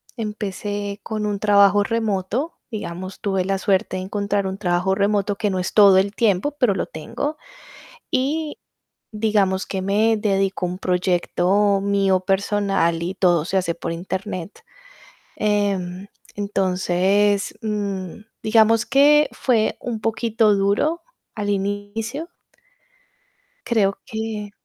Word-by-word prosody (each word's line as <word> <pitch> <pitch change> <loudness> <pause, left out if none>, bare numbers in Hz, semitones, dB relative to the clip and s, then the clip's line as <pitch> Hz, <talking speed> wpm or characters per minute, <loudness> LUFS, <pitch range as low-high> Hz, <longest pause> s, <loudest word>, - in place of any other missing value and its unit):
Empecé 205 -2 -4
con 215 -1 -3
un 205 -1 -2
trabajo 200 -1 +5
remoto, 225 - -2
digamos, 185 -4 -6
tuve 195 -2 0
la 195 +1 -1
suerte 190 -1 0
de 185 - -4
encontrar 200 0 -1
un 190 +1 -4
trabajo 180 -1 +1
remoto, 200 0 0
que 210 - 0
no 190 - -2
es 180 0 -3
todo 200 -3 +7
el 195 +2 +2
tiempo, 215 +4 +1
pero 235 -7 +3
lo - - -1
tengo. 235 - -5 0.7
Y 295 +4 -1 0.5
digamos, 210 -3 +1
que 190 - -4
me 215 +4 +2
dedico 195 -3 0
a - - -3
un 180 - -5
proyecto 185 +2 +1
mío 195 -1 +2
personal, 195 -3 0
y 180 +3 -3
todo 175 -4 +3
se 190 - 0
hace 180 -3 0
por 170 - -5
Internet. 185 +2 -5 0.8
Em, 200 -3 -1 0.3
entonces, 195 0 +1
mm, 200 -3 -3 0.2
digamos, 225 +1 +4
que 295 +2 +5
fue 230 -4 +1
un 235 -3 -4
poquito 225 -1 +2
duro 205 - +1 0.3
al 205 -2 -2
inicio. 205 - -3 1.4
Creo 200 -4 +1
que 220 -3 -5
200 Hz, 125 wpm, -22 LUFS, 190-215 Hz, 1.4 s, todo